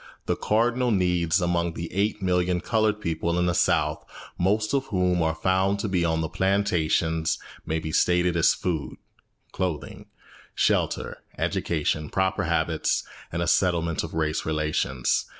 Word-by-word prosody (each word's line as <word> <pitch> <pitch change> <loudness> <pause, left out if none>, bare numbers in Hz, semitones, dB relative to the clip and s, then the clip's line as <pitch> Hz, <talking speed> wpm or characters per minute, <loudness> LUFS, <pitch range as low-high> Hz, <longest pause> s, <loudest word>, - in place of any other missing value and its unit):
The - - 0
cardinal 120 +3 +1
needs 90 -4 +2
among 85 -1 0
the 85 - -4
eight 100 +1 0
million 90 -1 +1
coloured 110 +2 +1
people 85 -1 -1
in 90 - +2
the 90 - +1
South, 75 -2 +1 0.3
most 105 +5 +1
of 135 -1 0
whom 90 -3 +1
are 80 0 +1
to 95 +4 +1
be 95 -3 0
found - - +2
on 80 0 0
the 80 - -1
plantations, 80 -4 +1 0.3
may 80 +1 0
be 80 -1 -4
stated 90 +1 +2
as 85 - +4
food, 80 -6 -3 0.5
clothing, 90 -5 -4 0.5
shelter, - - 0 0.2
education, 75 -2 -1
proper 95 -1 0
habits, - - 0 0.3
and 85 +1 -1
a - - -2
settlement 85 -3 +1
of - - -6
race 80 -1 0
relations. 75 -5 0
90 Hz, 150 wpm, -25 LUFS, 80-95 Hz, 0.5 s, as